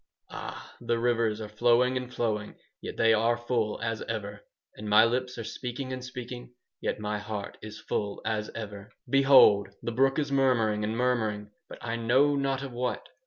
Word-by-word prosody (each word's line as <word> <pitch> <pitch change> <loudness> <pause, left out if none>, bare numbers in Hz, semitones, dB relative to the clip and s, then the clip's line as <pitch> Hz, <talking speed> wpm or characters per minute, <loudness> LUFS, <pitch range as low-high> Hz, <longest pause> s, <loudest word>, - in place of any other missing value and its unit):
Ah! - - -8
the 120 0 0
rivers 115 -2 +1
are 110 - -5
flowing 120 +4 +3
and 125 -1 -3
flowing, 105 -4 -2 0.3
yet - - -7
they 115 0 +5
are 115 +2 +2
full 120 -3 -1
as 115 -1 -2
ever. 105 -2 -4 0.3
And 105 0 -7
my 105 +2 +7
lips 125 +2 -1
are 115 - -4
speaking 125 +3 -5
and 130 -1 -5
speaking, 125 -1 -8 0.3
yet - - -2
my 105 0 -2
heart 105 -1 -6
is 110 0 -8
full 100 -1 -3
as 110 -1 -1
ever 105 -2 -7 0.2
"Behold! 135 -7 +6
The 120 - -2
brook 135 +3 +2
is 145 -2 -1
murmuring 120 -6 +2
and 110 +2 -2
murmuring, 110 -4 0 0.2
but - - -9
I 115 0 -3
know 130 +5 +3
not 135 -1 -1
of 135 - -6
what. 125 +1 -3
115 Hz, 180 wpm, -28 LUFS, 105-125 Hz, 0.3 s, my